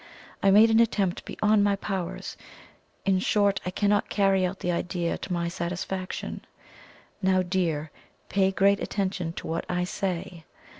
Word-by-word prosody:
I 195 - +4
made 215 +3 +7
an 225 - +5
attempt 205 -6 +1
beyond 210 -1 +2
my 205 -1 +3
powers 190 -3 -4 0.7
in 190 -1 +3
short, 200 0 +2
I - - +1
cannot 205 +2 +1
carry 195 -2 +2
out 185 +1 -2
the 180 - 0
idea 170 0 -1
to - - -7
my 170 -1 0
satisfaction. 180 +2 -4 0.8
Now, 185 -1 +3
dear, 165 -5 -1 0.4
pay 195 -1 +2
great 200 +1 +3
attention 185 -4 -2
to - - -7
what 165 +1 -2
I 180 0 0
say. 180 -2 -4
190 Hz, 150 wpm, -26 LUFS, 175-200 Hz, 0.8 s, made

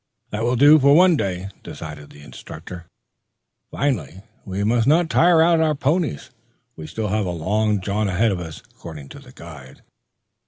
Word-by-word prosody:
"That 105 - -4
will 120 +2 0
do 145 +5 +6
for 140 +1 +5
one 180 +1 +5
day," 95 -5 -3
decided 75 -2 -9
the 75 - -15
instructor, 85 +3 -11 0.8
finally. 95 - -3 0.2
"We 95 +1 -3
must 115 +2 +1
not 165 +3 +3
tire 170 -2 +4
out 165 0 +3
our 155 -1 +1
ponies, 150 +2 -1 0.4
for 80 - -13
we 80 - -8
still 110 +3 -4
have 105 -1 -1
a - - -2
long 100 +5 -1
jaunt 100 +2 -2
ahead 100 +5 +1
of 95 - -3
us, 80 -3 -9
according 75 -5 -11
to - - -11
the - - -16
guide." 75 -6 -13
105 Hz, 180 wpm, -21 LUFS, 85-140 Hz, 0.8 s, do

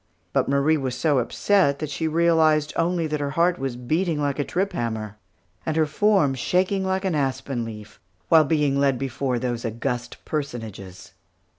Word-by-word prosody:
But - - +1
Marie 140 +3 +3
was 130 -3 -3
so 145 -2 +2
upset 140 - +2
that 150 0 -5
she 160 +3 -2
realized 160 -2 +3
only 170 0 +1
that 150 -1 -2
her 145 -1 -2
heart 170 +5 +1
was 135 -2 -3
beating 155 +6 -1
like 145 -1 -1
a - - +2
trip 190 +6 -2
hammer, 110 - -4 0.4
and 160 0 -2
her 160 - +4
form 180 -2 +2
shaking 185 +8 0
like 190 +1 -1
an 185 - 0
aspen 135 -3 -1
leaf, 105 -2 -9 0.3
while 160 -1 +6
being 145 -2 +1
led 140 -2 +2
before 135 0 -2
those 120 -1 -3
august 120 +1 -3
personages. 110 - -6
145 Hz, 170 wpm, -24 LUFS, 125-165 Hz, 0.4 s, while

